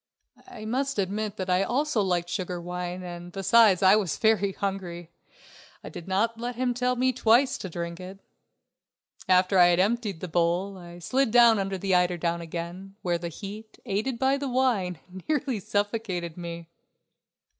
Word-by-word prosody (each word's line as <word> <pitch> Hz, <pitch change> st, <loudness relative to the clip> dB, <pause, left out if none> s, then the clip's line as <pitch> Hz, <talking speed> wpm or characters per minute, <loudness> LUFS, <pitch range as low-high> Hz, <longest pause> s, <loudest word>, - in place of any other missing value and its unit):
I 215 Hz, -3 st, -9 dB
must 270 Hz, +4 st, -1 dB
admit 205 Hz, +2 st, -2 dB
that 185 Hz, -, -3 dB
I 180 Hz, 0 st, +2 dB
also 255 Hz, +3 st, 0 dB
liked 180 Hz, -3 st, 0 dB
sugared 180 Hz, -1 st, -4 dB
wine 180 Hz, +1 st, -5 dB
and 175 Hz, 0 st, -8 dB
besides 195 Hz, 0 st, +4 dB
I 190 Hz, +2 st, +7 dB
was 195 Hz, -7 st, -1 dB
very 215 Hz, -3 st, +2 dB
hungry. 180 Hz, -4 st, -4 dB, 0.7 s
I -, -, -7 dB
did 170 Hz, -, -9 dB
not 220 Hz, +5 st, 0 dB
let 240 Hz, +1 st, -4 dB
him 250 Hz, 0 st, 0 dB
tell 250 Hz, +1 st, 0 dB
me 255 Hz, +1 st, +1 dB
twice 245 Hz, +3 st, +3 dB
to 190 Hz, -, -6 dB
drink 170 Hz, 0 st, -5 dB
it. 185 Hz, +1 st, -9 dB, 1.1 s
After 185 Hz, +1 st, +4 dB
I 175 Hz, -, +8 dB
had 175 Hz, 0 st, +3 dB
emptied 205 Hz, -2 st, 0 dB
the 185 Hz, -, -5 dB
bowl 175 Hz, +4 st, 0 dB
I 175 Hz, -2 st, -11 dB
slid 255 Hz, +9 st, 0 dB
down 235 Hz, -2 st, +6 dB
under 195 Hz, 0 st, -2 dB
the 190 Hz, +1 st, -1 dB
eiderdown 175 Hz, -1 st, +1 dB
again, 170 Hz, +4 st, -7 dB
where 175 Hz, -1 st, 0 dB
the 170 Hz, 0 st, -4 dB
heat, 210 Hz, +6 st, -9 dB
aided 220 Hz, +4 st, -1 dB
by 265 Hz, +2 st, +2 dB
the 280 Hz, -1 st, -3 dB
wine, 240 Hz, -9 st, +1 dB, 0.3 s
nearly 285 Hz, -7 st, 0 dB
suffocated 205 Hz, -4 st, -2 dB
me. 170 Hz, -1 st, -7 dB
195 Hz, 165 wpm, -26 LUFS, 175-230 Hz, 1.1 s, I